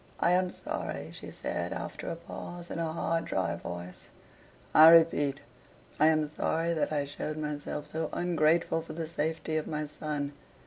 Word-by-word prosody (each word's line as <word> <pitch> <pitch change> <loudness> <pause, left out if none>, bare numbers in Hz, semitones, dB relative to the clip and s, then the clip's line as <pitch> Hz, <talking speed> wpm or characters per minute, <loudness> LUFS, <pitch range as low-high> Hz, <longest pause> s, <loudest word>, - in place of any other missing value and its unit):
"I 175 - +3
am 180 0 +3
sorry," - - -5
she - - -7
said, - - -3
after - - -6
a - - -2
pause, 175 0 -8
in - - -3
a 165 -1 -1
hard, 165 0 -1
dry 95 -3 0
voice, 85 +1 -7 0.7
"I 160 +1 +10
REPEAT 160 -4 +5 0.6
I 155 - +6
am 155 -2 +2
sorry 165 +1 +1
that 155 - 0
I 145 -2 0
showed 150 +2 -5
myself 150 -1 -4
so 160 0 -3
ungrateful 165 -1 +2
for 160 -1 -8
the 165 0 -3
safety 160 0 -2
of 155 - -2
my 150 -1 -2
son. 145 -1 -4
155 Hz, 170 wpm, -30 LUFS, 145-165 Hz, 0.7 s, I